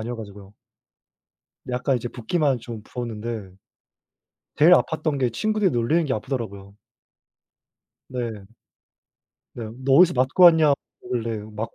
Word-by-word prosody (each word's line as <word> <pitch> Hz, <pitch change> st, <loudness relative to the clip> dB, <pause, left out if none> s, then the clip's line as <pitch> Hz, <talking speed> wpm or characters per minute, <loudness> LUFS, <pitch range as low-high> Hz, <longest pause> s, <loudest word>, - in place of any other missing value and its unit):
아니어 120 Hz, +2 st, -5 dB
가지고요. 100 Hz, -2 st, -11 dB, 1.2 s
약간 125 Hz, +1 st, 0 dB
이제 120 Hz, 0 st, -4 dB
붓기만 135 Hz, +3 st, 0 dB
좀 115 Hz, -3 st, -8 dB
부었는데 115 Hz, -4 st, -6 dB, 1.1 s
제일 165 Hz, +4 st, +6 dB
아팠던 155 Hz, -4 st, +2 dB
게 125 Hz, -2 st, +1 dB
친구들이 215 Hz, -, 0 dB
놀리는 135 Hz, +8 st, +1 dB
게 140 Hz, -, -2 dB
아프더라고요. 105 Hz, -5 st, -5 dB, 1.3 s
네. 115 Hz, -6 st, -5 dB, 1.1 s
네. 120 Hz, -, -6 dB, 0.2 s
너 135 Hz, -, +2 dB
어디서 175 Hz, +3 st, +6 dB
맞고 130 Hz, +8 st, +3 dB
왔냐 160 Hz, -4 st, +7 dB, 0.3 s
그러길래 115 Hz, -3 st, -3 dB
맞고 110 Hz, +2 st, -7 dB
120 Hz, 280 characters per minute, -23 LUFS, 110-145 Hz, 1.3 s, 왔냐